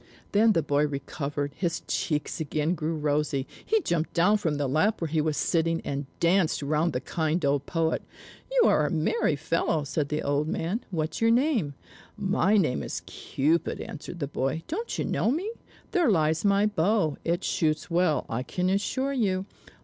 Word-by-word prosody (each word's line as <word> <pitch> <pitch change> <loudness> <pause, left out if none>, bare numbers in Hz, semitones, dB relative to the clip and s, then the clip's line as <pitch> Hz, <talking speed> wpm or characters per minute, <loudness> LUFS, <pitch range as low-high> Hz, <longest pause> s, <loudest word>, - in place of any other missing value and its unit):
Then 220 +2 +5
the 165 -4 +1
boy 145 +1 +2
recovered, 145 0 -4
his 170 -3 -1
cheeks 150 +1 -2
again 155 +1 0
grew 160 -1 -2
rosy, 145 -2 0 0.2
he 440 0 +2
jumped 170 - -1
down 200 +5 +4
from 160 -7 0
the 145 0 -1
lap 160 +11 +2
where 165 - -1
he 155 0 +1
was 155 -1 -1
sitting, 165 0 +1
and 140 0 -3
danced 170 -3 +2
round 155 +4 +1
the 125 - 0
kind 160 +3 -1
old 140 0 +1
poet. 165 -2 0 0.5
"You - - +4
are 150 - +3
a - - -2
merry 155 -1 +1
fellow," 160 +1 0
said 145 0 -2
the 150 0 -1
old 145 +2 0
man. 175 +8 -2
"What's 160 -2 -3
your 225 - +4
name?" 235 - +2 0.4
"My 200 0 +2
name 155 -10 +1
is - - -5
Cupid," 155 +5 -1
answered 165 +3 -7
the 140 - -2
boy. 135 +3 -2
"Don't 445 +9 -3
you - - -1
know - - +1
me? 350 - -1 0.4
There 350 - +3
lies 160 -4 +2
my 200 0 +4
bow; 200 -5 +1
it 170 +2 0
shoots 155 0 0
well, 170 -5 +2
I 115 +2 -2
can 180 +8 -1
assure 260 +8 0
you! 195 -7 0
160 Hz, 180 wpm, -27 LUFS, 150-195 Hz, 0.5 s, Then